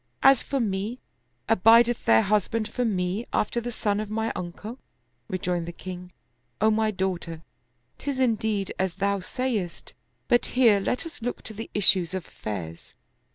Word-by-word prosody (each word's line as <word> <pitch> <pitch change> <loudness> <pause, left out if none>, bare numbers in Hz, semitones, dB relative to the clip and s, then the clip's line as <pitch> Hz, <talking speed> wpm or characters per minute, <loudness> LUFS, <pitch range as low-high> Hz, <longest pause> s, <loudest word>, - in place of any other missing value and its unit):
As 270 -2 +7
for 275 - -2
me, 210 +1 -1 0.5
abid 230 +5 +6
eth 240 0 -3
there 110 0 +6
husband 215 +2 +1
for 245 +3 -2
me, 195 0 -1
after 235 +3 0
the 240 +1 -4
son 205 -2 0
of 215 -1 -4
my 220 +1 -1
uncle? 205 +8 -6 0.2
" 120 0 -46
Re 185 - -1
joined 175 -2 -2
the - - -4
king, 180 0 -8 0.2
" 120 0 -46
O 220 +1 +4
my 220 0 +2
daughter, 180 -5 -3 0.6
'tis 280 -2 -3
indeed 220 -5 0
as 190 -2 0
thou 200 +1 0
sayest; 210 -3 -3 0.3
but 240 - +3
here 230 -6 +6
let 245 +9 -2
us 330 -6 -9
look 245 +2 -4
to 220 - -8
the 225 +2 -7
issues 190 -3 +4
of 185 - -4
affairs. 85 -6 -7
205 Hz, 175 wpm, -26 LUFS, 180-230 Hz, 0.6 s, As